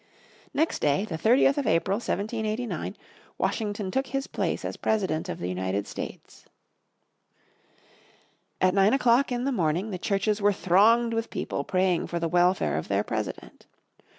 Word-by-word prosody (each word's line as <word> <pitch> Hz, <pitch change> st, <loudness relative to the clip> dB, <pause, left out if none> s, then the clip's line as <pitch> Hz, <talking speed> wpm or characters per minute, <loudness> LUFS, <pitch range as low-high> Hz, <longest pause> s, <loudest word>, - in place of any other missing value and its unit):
Next 320 Hz, +3 st, 0 dB
day, 145 Hz, +7 st, +1 dB
the 180 Hz, -, -5 dB
30th 250 Hz, -, +3 dB
of 280 Hz, -, -2 dB
April, 180 Hz, +4 st, +2 dB
1789, 220 Hz, +1 st, -3 dB, 0.4 s
Washington 205 Hz, -3 st, -2 dB
took 265 Hz, +4 st, -1 dB
his 270 Hz, 0 st, -2 dB
place -, -, -2 dB
as -, -, -4 dB
President 190 Hz, -8 st, -1 dB
of -, -, -4 dB
the 90 Hz, -, -4 dB
United 95 Hz, +2 st, -2 dB
States. -, -, -8 dB, 2.1 s
At 185 Hz, 0 st, +3 dB
nine 195 Hz, +2 st, +4 dB
o'clock 250 Hz, 0 st, +3 dB
in 245 Hz, 0 st, -1 dB
the 275 Hz, -, 0 dB
morning 180 Hz, -, 0 dB
the 185 Hz, -, -4 dB
churches 205 Hz, +2 st, 0 dB
were 205 Hz, 0 st, +4 dB
thronged 225 Hz, +6 st, +4 dB
with 225 Hz, 0 st, -2 dB
people 140 Hz, -, -3 dB
praying 185 Hz, +1 st, +1 dB
for 170 Hz, -, -3 dB
the 165 Hz, -, -1 dB
welfare 175 Hz, -, +2 dB
of -, -, -7 dB
their 100 Hz, +1 st, +1 dB
President. 110 Hz, -2 st, -5 dB
200 Hz, 150 wpm, -26 LUFS, 170-230 Hz, 2.1 s, nine